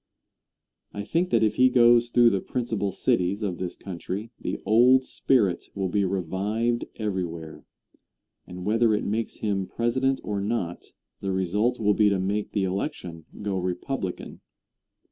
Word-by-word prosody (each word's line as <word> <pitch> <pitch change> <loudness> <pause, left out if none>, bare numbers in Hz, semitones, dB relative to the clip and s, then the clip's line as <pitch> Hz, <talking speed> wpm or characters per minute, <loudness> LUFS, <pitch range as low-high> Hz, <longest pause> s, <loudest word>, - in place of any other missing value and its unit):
I 100 - -4
think 170 - 0
that 115 -1 +3
if 110 - +1
he 130 0 +6
goes 120 -1 +5
through 120 -1 +5
the 100 - +1
principal 110 -5 -2
cities 95 +3 0
of 95 -4 -3
this 90 -2 -4
country 95 +4 -6
the - - -3
old 125 +4 +5
spirit 105 -12 +1
will 95 -2 -1
be 100 +2 +1
revived 100 +6 -1
everywhere, 85 -7 -4 0.8
and 90 0 -8
whether 110 +1 +3
it - - -2
makes 110 +3 -3
him 100 -3 0
President 130 +3 0
or 100 -1 -2
not 100 -5 -3 0.3
the 95 - -3
result 100 +6 0
will 105 -2 +3
be 105 0 +4
to 100 - +1
make 100 +3 -2
the 100 - +1
election 90 -3 -4 0.2
go 100 -2 -1
Republican. 90 +3 -4
105 Hz, 150 wpm, -26 LUFS, 95-115 Hz, 0.8 s, he